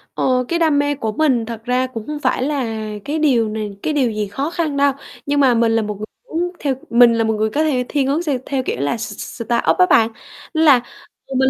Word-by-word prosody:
Ờ, 255 -1 +1
cái 340 - -1
đam 315 -4 +3
mê 290 0 +1
của 225 -5 -3
mình 255 -2 +1
thật 225 -1 -7
ra 250 +1 +1
cũng 230 -2 -8
hông 300 -1 -4
phải 255 - 0
là 280 -1 -1 0.4
cái 300 +2 -2
điều 245 -8 +2
này 215 -1 -4
cái 310 - 0
điều 265 -6 +1
gì 210 -1 -2
khó 270 +10 -3
khăn 325 -4 -2
đâu. 280 0 +4 0.3
Nhưng 285 0 +1
mà 265 -3 +5
mình 230 -1 +2
là 225 - +2
một 210 -1 -4
người 210 - -5 0.2
muốn 350 0 -1
theo 275 -3 -1
mình 235 0 +6
là 230 0 +1
một 220 0 +1
người 215 0 0
có 295 +8 0
thể 260 -5 0
thiên 280 -3 0
hướng 285 +4 +1
s 325 - -3 0.2
theo 270 -2 -2
kiểu 125 - -3
là 145 - -1
s 215 -1 -5
s - - -8
startup 220 -9 +1
á 180 - +6
bạn. 225 -1 +5 0.4
Nên 320 +1 +2
là 270 -5 +6 0.6
mình 265 0 +4
255 Hz, 255 wpm, -19 LUFS, 225-290 Hz, 0.6 s, mình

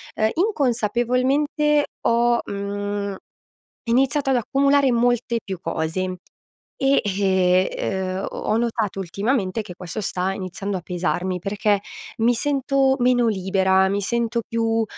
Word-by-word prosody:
ehm, 215 - +2
inconsapevolmente 280 - +1
ho, 235 0 +3
mhmm, 200 0 -3 0.7
iniziato 270 +4 +2
ad - - +3
accumulare 275 +3 +3
molte 240 0 +1
più 190 -2 -5
cose 185 +3 -2 0.6
e, 270 +1 +3 0.7
ehm, 190 -1 -2
uhm, - - -3
ho - - -8
ho 215 - +2
notato 225 -4 -1
ultimamente 200 +3 -1
che 180 -4 -10
questo 180 +3 -6
sta 190 -2 -1
iniziando 195 +1 -4
a - - -4
pesarmi, 180 +1 -2
perché 205 +2 0 0.4
mi 235 +2 +3
sento 270 0 +1
meno 245 -1 +3
libera, 190 -1 +2
mi 200 +1 0
sento 235 +2 -1
più 225 0 +1
225 Hz, 125 wpm, -22 LUFS, 190-250 Hz, 0.7 s, ho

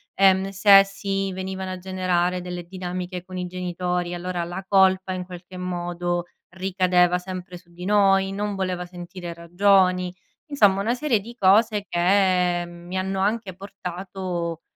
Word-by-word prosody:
Ehm, 190 0 +4
se 195 0 +7
si 195 0 -3
venivano 190 0 -5
a 185 - -4
generare 180 -1 0
delle 180 0 -6
dinamiche 180 0 -5
con 185 0 -8
i 180 - -2
genitori 180 0 -3
allora 175 0 -3
la 180 +3 -6
colpa 190 -1 +3
in 180 -1 -4
qualche 180 0 -10
modo 175 -1 -2 0.2
ricadeva 180 -1 +2
sempre 180 0 -7
su 175 0 -21
di 180 +1 -10
noi. 195 -1 +3
Non 205 0 -3
voleva 185 -2 -2
sentire 175 0 -8
ragioni. 180 +1 +2 0.3
Insomma 205 -10 +3
una 230 +4 +1
serie 250 -6 +1
di 235 +4 -11
cose 205 +1 +4
che 180 -1 +2
mi 175 +2 -7
hanno 190 +1 -2
anche 205 -1 -1
portato 180 -3 -5
185 Hz, 145 wpm, -24 LUFS, 180-195 Hz, 0.3 s, se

